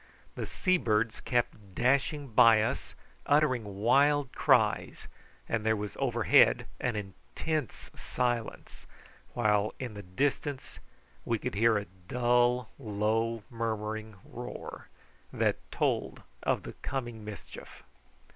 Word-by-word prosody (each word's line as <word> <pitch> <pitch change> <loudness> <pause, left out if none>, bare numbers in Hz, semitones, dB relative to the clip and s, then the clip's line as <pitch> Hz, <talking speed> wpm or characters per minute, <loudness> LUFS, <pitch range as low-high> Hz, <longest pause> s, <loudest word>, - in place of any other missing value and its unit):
The - - -5
sea 185 -1 +1
birds 110 -5 0
kept 110 -5 -2
dashing 140 +3 +1
by 110 -1 +6
us, - - -3 0.3
uttering 145 -6 +3 0.2
wild 140 +3 +4
cries, - - +2 0.4
and 110 -1 -1
there 110 0 +2
was 105 -1 -5
overhead 120 -5 +4
an 120 -2 -1
intense 100 - -4
silence, 120 -3 -3 0.5
while 105 -2 +1
in 125 -4 -5
the 105 - -7
distance 135 - -2 0.4
we 115 - 0
could - - -4
hear 110 +1 +3
a 105 - -3 0.2
low 120 0 +2 0.2
dull 110 +2 0
murmuring 110 -1 -3
roar, 125 +1 -8 0.4
that - - +1
told - - -1 0.2
of - - 0
the - - -8
coming 120 -5 -4
mischief. 105 -1 -10
115 Hz, 115 wpm, -30 LUFS, 105-125 Hz, 0.5 s, by